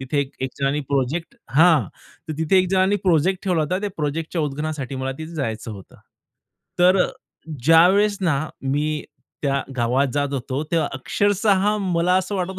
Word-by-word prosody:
तिथे 130 +2 -2
एक 140 - -3
एक 130 - -2
जणांनी 140 +2 0
प्रोजेक्ट 140 +5 -1 0.2
हां 155 - +5 0.4
तर 155 - -2
तिथे 160 +4 +2
एक 185 0 +2
जणांनी 190 +1 +3
प्रोजेक्ट 180 +2 +2
ठेवला 180 -4 +1
होता 180 +5 -1
त्या 205 - -2
प्रोजेक्टच्या 160 +3 -2
उद्घाटनासाठी 150 -2 -3
मला 130 0 -3
तिथे 160 +1 -7
जायचं 115 -6 -3
होतं. 100 -3 -11 0.8
तर 180 +2 +5 0.7
ज्यावेळेस 185 +7 +5
ना 165 -7 +1 0.2
मी 140 +2 0 0.6
त्या 140 -1 0
गावात 125 +4 +2
जात 145 -1 +1
होतो 135 +1 -3
तेव्हा 165 -2 +1
अक्षरशः 205 +7 +1
मला 180 -2 +1
असं 190 +2 -3
वाटत 185 0 -3
160 Hz, 155 wpm, -22 LUFS, 140-185 Hz, 0.8 s, हां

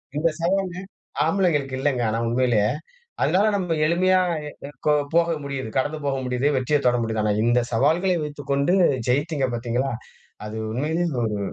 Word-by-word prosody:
இந்த 160 +3 +2
சவால் 185 +1 0 0.5
ஆம்பளைங்களுக்கு 150 -9 +1
இல்லங்க, 130 -2 0
ஆனா 110 - 0
உண்மையிலேயே. 120 -3 +2 0.5
அதனால 195 +4 +3
நம்ம 180 -4 -1
எளிமையா 185 +3 +3 0.5
எ - - -8 0.2
கோ 150 - +4 0.2
போக 170 0 +3
முடியுது, 140 -3 -4
கடந்து 145 +4 0
போக 140 -1 0
முடியுது, 125 +2 0
வெற்றியத் 140 +3 +1
தொட 120 0 +4
முடியுது. 110 -1 -1
ஆனா 105 - +2
இந்தச் 120 +1 +2
சவால்களை 160 +10 +2
வைத்துக்கொண்டு 145 +2 -1 0.3
ஜெயிச்சீங்க 145 +2 +1
பாத்தீங்களா? 120 +3 -1 0.5
அது 110 +1 -6
உண்மையிலேயே 160 +8 -1
ஒரு 105 -2 -1
140 Hz, 145 wpm, -23 LUFS, 125-165 Hz, 0.5 s, கோ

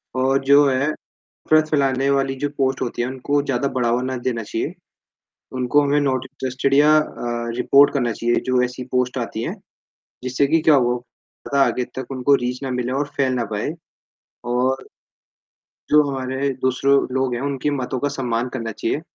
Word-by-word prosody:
और 130 +1 +2
जो 140 +1 +6
है, 135 +2 +1 0.4
नफ़रत 155 0 +1
फैलाने 135 -2 +1
वाली 135 -1 +1
जो - - +2
पोस्ट 135 -1 0
होती 120 -1 -2
हैं, 120 - -1
उनको 140 +2 -1
ज़्यादा 140 -1 -1
बढ़ावा 120 0 +1
ना 130 0 -2
देना 115 -2 -2
चाहिए। 115 - -4 0.8
उनको 130 +3 +2
हमें 145 +1 +2
नॉट 130 -3 0
इंटरेस्टेड 130 +1 -2
या 150 +2 +6
अ, 120 -5 -3
रिपोर्ट 140 +3 +5
करना 120 -4 0
चाहिए, 120 +2 0
जो 130 -1 +2
ऐसी 125 0 -5
पोस्ट 125 +1 0
आती 115 -2 -4
हैं, - - -4 0.7
जिससे 130 +2 +1
कि 160 +3 +2
क्या 155 0 +5
हो 125 -3 +3 0.5
ज़्यादा 140 -1 +3
आगे 125 - -1
तक 130 - -4
उनको 135 +1 +2
रीच 125 +2 -3
ना 135 - -3
मिले 125 +1 -2
और - - -3
फैल 135 -2 +1
ना 120 -2 -1
पाए, 110 +9 -2 0.7
और 125 +2 0 1.0
जो 150 - +6
हमारे 130 +1 -2
दूसरो 130 +2 +2 0.2
लोग 130 -1 0
हैं, 120 - -4
उनकी 140 +1 -1
बातों 130 -2 -2
का 145 - 0
सम्मान 120 -1 -1
करना 115 -3 -4
चाहिए, 115 +7 -2
130 Hz, 180 wpm, -21 LUFS, 125-140 Hz, 1.0 s, जो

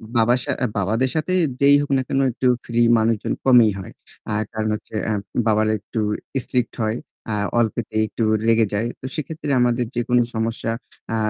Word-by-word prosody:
বাবার 120 +2 +4
সা - - -2 0.3
বাবাদের 110 +6 +1
সাথে 160 +4 0 0.3
যেই 140 0 +7
হোক 145 - -4
না - - +1
কেন 135 - 0
একটু 130 +2 -1 0.2
ফ্রি 120 0 -1 0.2
মানুষজন 110 -1 +1
কমই 120 -4 +7
হয়। 95 - -9 0.4
আর 110 +1 0
কারণ 110 0 -1
হচ্ছে 105 +1 -10
আ - - +1 0.4
বাবারা 110 0 +3
একটু 110 +3 -5 0.4
স্ট্রিক্ট 125 -1 -1
হয়, 110 +2 0 0.3
আ - - 0 0.3
অল্পতেই 110 -1 0
একটু 115 - -3 0.2
রেগে 115 0 +4
যায়। 105 +3 0
তো - - -10
সেক্ষেত্রে 155 0 -5
আমাদের 120 0 +2
যেকোনো 120 +1 +2
সমস্যা, 115 0 -2 0.4
আ - - +1
115 Hz, 170 wpm, -22 LUFS, 110-125 Hz, 0.4 s, যেই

